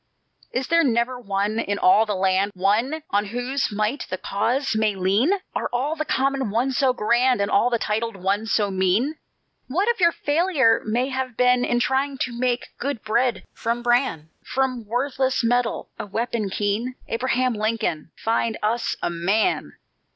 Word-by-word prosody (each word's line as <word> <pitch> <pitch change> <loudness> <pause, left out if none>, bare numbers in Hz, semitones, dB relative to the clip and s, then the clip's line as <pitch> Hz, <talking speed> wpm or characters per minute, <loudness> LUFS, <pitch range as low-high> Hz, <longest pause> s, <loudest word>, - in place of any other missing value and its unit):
"Is 255 0 -2
there 335 0 +4
never 245 0 +1
one 205 0 -1
in 205 -3 -1
all 210 +4 +4
the 210 - -1
land, 190 +2 +1
One 225 - +1
on 205 +1 +2
whose 245 +6 -2
might 215 +6 -1
the 185 - -3
Cause 235 +8 -1
may 215 -2 +1
lean? 195 - +2 0.2
Are - - -2
all 270 +6 -1
the 310 -1 -3
common 270 -3 0
ones 245 +5 0
so 265 0 +3
grand, 245 +1 +2
And 200 0 0
all 265 -2 +4
the 235 - +1
titled 220 0 -2
ones 200 +4 -1
so 205 -2 +2
mean? 190 +11 +1 0.5
What 365 - 0
if 470 - +1
your 340 -2 +5
failure 295 -7 +2
may 240 +5 0
have 260 -2 -3
been 250 0 +4
In 240 -1 +1
trying 270 +2 0
to 250 - -1
make 245 0 -1
good 275 -3 -3
bread 235 +3 +1
from 235 +1 -2
bran, 240 - +1
From 255 -4 -2
worthless 260 +2 0
metal 245 0 0
a - - -5
weapon 220 0 -2
keen? 210 +6 -1
Abraham 250 +1 0
Lincoln, 215 -8 -2
find 225 0 0
us 230 +3 0
a - - 0
MAN! 190 +6 0
235 Hz, 170 wpm, -23 LUFS, 210-260 Hz, 0.5 s, your